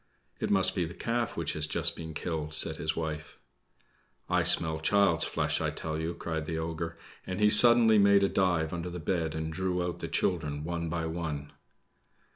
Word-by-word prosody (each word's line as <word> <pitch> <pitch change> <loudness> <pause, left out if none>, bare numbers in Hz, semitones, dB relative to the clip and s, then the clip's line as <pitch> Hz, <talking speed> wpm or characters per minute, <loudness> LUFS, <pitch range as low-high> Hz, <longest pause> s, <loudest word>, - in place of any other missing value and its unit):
"It - - -2
must 95 -2 +4
be 90 - -1
the 85 +1 -6
calf 120 -1 -2
which - - -2
has 75 0 0
just - - +2
been 80 -1 -8
killed," 80 -1 -4
said - - +1
his 80 - -2
wife. 80 -1 -5 0.9
"I - - +2
smell 80 -1 +2
child's 95 0 +2
flesh, - - -1
I - - 0
tell 80 -1 -4
you!" 80 +1 -3
cried 80 -2 -4
the 80 - -3
ogre, 80 0 -4 0.3
and 95 +1 -4
he 105 0 +4
suddenly 115 0 +6
made 100 0 +5
a - - +4
dive 90 -5 0
under 85 0 -4
the 90 - -6
bed, 80 -1 -2
and 80 0 -4
drew 90 0 -1
out 90 -1 -4
the - - -4
children 75 -5 -1
one 85 0 -3
by 85 0 -2
one. 80 -3 -4
85 Hz, 195 wpm, -29 LUFS, 80-95 Hz, 0.9 s, suddenly